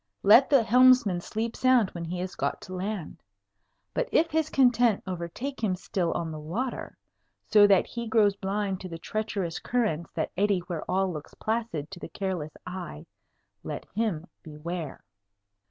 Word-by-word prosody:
Let 230 Hz, +7 st, +7 dB
the 275 Hz, -5 st, +5 dB
helmsman 245 Hz, -5 st, +5 dB
sleep 225 Hz, +5 st, -3 dB
sound 255 Hz, -6 st, +3 dB
when 170 Hz, -1 st, -6 dB
he 175 Hz, +2 st, -4 dB
has 185 Hz, 0 st, -4 dB
got -, -, -2 dB
to 185 Hz, -, -9 dB
land! 190 Hz, -2 st, -4 dB, 0.7 s
But -, -, -1 dB
if 330 Hz, 0 st, +3 dB
his 315 Hz, 0 st, +1 dB
content 245 Hz, -5 st, +3 dB
overtake 190 Hz, +9 st, -5 dB
him 190 Hz, -4 st, +2 dB
still 180 Hz, -1 st, -2 dB
on 165 Hz, -2 st, -3 dB
the 155 Hz, -, -6 dB
water, 205 Hz, +13 st, -4 dB, 0.5 s
so 210 Hz, -2 st, +6 dB
that 195 Hz, -2 st, +5 dB
he 235 Hz, -1 st, -5 dB
grows 215 Hz, -3 st, +3 dB
blind 195 Hz, -1 st, -2 dB
to 185 Hz, -, -6 dB
the 165 Hz, -, -6 dB
treacherous 195 Hz, -2 st, -3 dB
currents 215 Hz, -10 st, -1 dB
that 160 Hz, -, -1 dB
eddy 200 Hz, +1 st, +2 dB
where 170 Hz, -2 st, -5 dB
all 190 Hz, -1 st, +1 dB
looks 150 Hz, -2 st, -8 dB
placid 220 Hz, -9 st, -3 dB
to 185 Hz, -, -8 dB
the -, -, -7 dB
careless 175 Hz, -4 st, -4 dB
eye, 180 Hz, -, -7 dB, 0.6 s
let -, -, -5 dB
him 200 Hz, -7 st, -1 dB, 0.2 s
beware! 160 Hz, 0 st, -6 dB
195 Hz, 165 wpm, -27 LUFS, 170-230 Hz, 0.7 s, Let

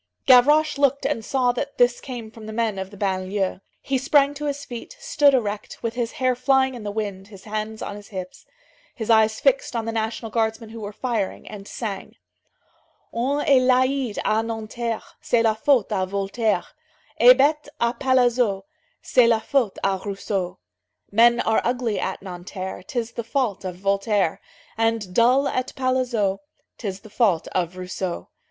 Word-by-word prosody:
Gavroche 290 Hz, +4 st, +5 dB
looked 280 Hz, 0 st, +2 dB
and 225 Hz, -, -1 dB
saw 250 Hz, +1 st, +1 dB
that 280 Hz, +3 st, -5 dB
this 245 Hz, 0 st, +3 dB
came 240 Hz, -4 st, -7 dB
from 220 Hz, -1 st, -11 dB
the -, -, -5 dB
men 220 Hz, -3 st, -1 dB
of 190 Hz, 0 st, -5 dB
the 205 Hz, -, -13 dB
banlieue. 190 Hz, 0 st, -1 dB, 0.2 s
He 270 Hz, -1 st, 0 dB
sprang 280 Hz, +1 st, +3 dB
to 295 Hz, +1 st, -6 dB
his 285 Hz, 0 st, -3 dB
feet, 245 Hz, -, -8 dB
stood 290 Hz, -, +3 dB
erect, 210 Hz, -4 st, -3 dB
with 230 Hz, -1 st, -1 dB
his 235 Hz, -1 st, -3 dB
hair 255 Hz, -1 st, +1 dB
flying 265 Hz, +1 st, +2 dB
in 245 Hz, -, -8 dB
the 210 Hz, -, -4 dB
wind, 200 Hz, -2 st, -4 dB
his 195 Hz, -3 st, -13 dB
hands 215 Hz, +1 st, -4 dB
on 205 Hz, -, -5 dB
his 205 Hz, -1 st, -11 dB
hips, 185 Hz, -2 st, -8 dB, 0.5 s
his 225 Hz, -1 st, -1 dB
eyes 220 Hz, 0 st, +4 dB
fixed -, -, +1 dB
on 230 Hz, -1 st, -1 dB
the 225 Hz, -, -2 dB
National 225 Hz, 0 st, -3 dB
Guardsmen 225 Hz, 0 st, -1 dB
who 225 Hz, +1 st, -9 dB
were 205 Hz, 0 st, -5 dB
firing, 220 Hz, -3 st, -3 dB
and 200 Hz, -1 st, -9 dB
sang: 205 Hz, -5 st, -6 dB, 1.0 s
"On 270 Hz, +5 st, 0 dB
est 275 Hz, -3 st, +4 dB
laid 255 Hz, -2 st, +2 dB
à 220 Hz, +1 st, +2 dB
Nanterre, 225 Hz, 0 st, -4 dB, 0.2 s
C'est 235 Hz, -1 st, +2 dB
la 220 Hz, -1 st, +3 dB
faute 235 Hz, 0 st, +2 dB
à 185 Hz, -1 st, 0 dB
Voltaire; 200 Hz, +1 st, -1 dB, 0.5 s
Et 245 Hz, +2 st, +9 dB
bête 300 Hz, +2 st, +2 dB
à 235 Hz, 0 st, +1 dB
Palaiseau, 245 Hz, -5 st, +2 dB, 0.4 s
C'est 250 Hz, -2 st, +4 dB
la 230 Hz, -1 st, +4 dB
faute 240 Hz, -3 st, 0 dB
à 190 Hz, -1 st, 0 dB
Rousseau." 195 Hz, -2 st, -3 dB, 0.5 s
"Men 235 Hz, +3 st, +5 dB
are 220 Hz, -, +2 dB
ugly 240 Hz, -2 st, -1 dB
at 190 Hz, -, -3 dB
Nanterre, 185 Hz, 0 st, -6 dB
'Tis 230 Hz, +4 st, -4 dB
the 235 Hz, -, -5 dB
fault 230 Hz, -4 st, -1 dB
of 185 Hz, -2 st, -4 dB
Voltaire; 200 Hz, -1 st, 0 dB, 0.4 s
And 225 Hz, -4 st, 0 dB
dull 250 Hz, +6 st, +4 dB
at 255 Hz, -1 st, -2 dB
Palaiseau, 250 Hz, -7 st, 0 dB, 0.4 s
'Tis 195 Hz, -4 st, -5 dB
the 215 Hz, -, -14 dB
fault 200 Hz, -10 st, +2 dB
of 180 Hz, 0 st, -2 dB
Rousseau." 185 Hz, 0 st, -4 dB
225 Hz, 175 wpm, -23 LUFS, 200-255 Hz, 1.0 s, Et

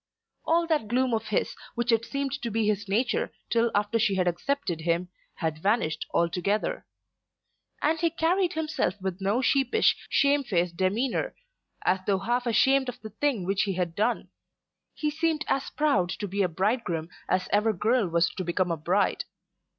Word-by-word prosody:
All 335 Hz, +1 st, +3 dB
that 310 Hz, -9 st, 0 dB
gloom 250 Hz, +2 st, +1 dB
of 220 Hz, -1 st, -1 dB
his, 210 Hz, -, -1 dB, 0.2 s
which 240 Hz, 0 st, 0 dB
had 230 Hz, 0 st, +2 dB
seemed 275 Hz, -1 st, -2 dB
to 235 Hz, -, -2 dB
be 225 Hz, 0 st, 0 dB
his 205 Hz, -1 st, -1 dB
nature 255 Hz, -, +1 dB, 0.2 s
till 235 Hz, 0 st, +3 dB
after 210 Hz, +2 st, +1 dB
she 205 Hz, -3 st, +2 dB
had 185 Hz, -1 st, +1 dB
accepted 175 Hz, -, -1 dB
him, 170 Hz, +2 st, 0 dB, 0.3 s
had 160 Hz, -2 st, -3 dB
vanished 195 Hz, -6 st, 0 dB
altogether. 180 Hz, +5 st, 0 dB, 1.0 s
And 320 Hz, +2 st, +2 dB
he 335 Hz, 0 st, +2 dB
carried 345 Hz, +3 st, +1 dB
himself 310 Hz, -, -1 dB
with 190 Hz, 0 st, -4 dB
no 205 Hz, +7 st, +1 dB
sheepish, 285 Hz, -, +3 dB
shame 280 Hz, 0 st, +3 dB
faced 175 Hz, -6 st, 0 dB
demeanour 225 Hz, -, 0 dB, 0.5 s
as 185 Hz, +1 st, +2 dB
though 200 Hz, -2 st, +3 dB
half 240 Hz, +5 st, -1 dB
ashamed 265 Hz, +3 st, +3 dB
of 250 Hz, 0 st, -7 dB
the 220 Hz, -, -8 dB
thing 230 Hz, -4 st, 0 dB
which 195 Hz, +1 st, +1 dB
he 195 Hz, -, 0 dB
had 175 Hz, -2 st, -2 dB
done. 220 Hz, +6 st, 0 dB, 0.7 s
He 300 Hz, -1 st, -1 dB
seemed 315 Hz, 0 st, 0 dB
as 275 Hz, 0 st, 0 dB
proud 220 Hz, -13 st, +1 dB
to 205 Hz, -, -4 dB
be 200 Hz, +2 st, -1 dB
a 185 Hz, -, +2 dB
bridegroom 180 Hz, -3 st, -1 dB, 0.2 s
as 185 Hz, 0 st, +1 dB
ever 210 Hz, +2 st, +4 dB
girl 220 Hz, +2 st, +1 dB
was 170 Hz, 0 st, +2 dB
to 185 Hz, -, -4 dB
become 175 Hz, +1 st, 0 dB
a 165 Hz, -, -1 dB
bride. 180 Hz, +6 st, +1 dB
215 Hz, 175 wpm, -27 LUFS, 185-270 Hz, 1.0 s, ever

